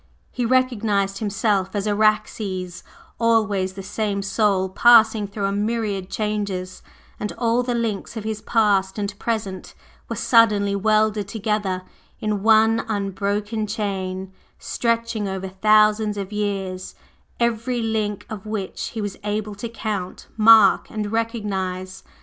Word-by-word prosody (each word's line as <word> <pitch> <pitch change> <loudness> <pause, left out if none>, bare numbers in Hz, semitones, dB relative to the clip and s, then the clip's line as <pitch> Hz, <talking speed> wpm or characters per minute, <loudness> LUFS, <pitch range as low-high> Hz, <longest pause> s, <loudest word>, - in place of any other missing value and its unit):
He 245 -2 -1
recognized 215 -6 +1
himself 200 -2 0
as 200 0 -1
Araxes 205 -3 0 0.4
always 210 -5 +2
the 195 0 -8
same 200 0 -2
Soul 195 -1 +1
passing 220 0 +5
through 200 0 -3
a 195 - 0
myriad 205 -2 -2
changes, 205 -4 -3 0.4
and 210 - -3
all 235 0 +1
the 245 -1 -2
links 230 -1 -3
of 220 - -4
his 215 -1 -4
past 200 -4 +2
and 200 -1 -2
present 210 -5 -3 0.3
were - - -3
suddenly 210 -4 +3
welded 215 0 +2
together 200 -3 -2 0.4
in 210 -2 -1
one 225 +1 +4
unbroken 205 +1 -2
chain, 190 -3 -3 0.2
stretching 230 -2 -1
over 190 0 -4
thousands 215 +2 +3
of 200 +1 -5
years, 195 -3 -3 0.4
every 235 +1 0
link 215 -2 -2
of 215 -1 -8
which 210 -3 -4
he 220 - -2
was 205 -2 -4
able 210 0 -2
to 205 +4 -6
count, 210 -5 -4
mark, 220 0 +6
and 210 -1 -4
recognize. 195 -5 -3
210 Hz, 130 wpm, -22 LUFS, 195-220 Hz, 0.4 s, mark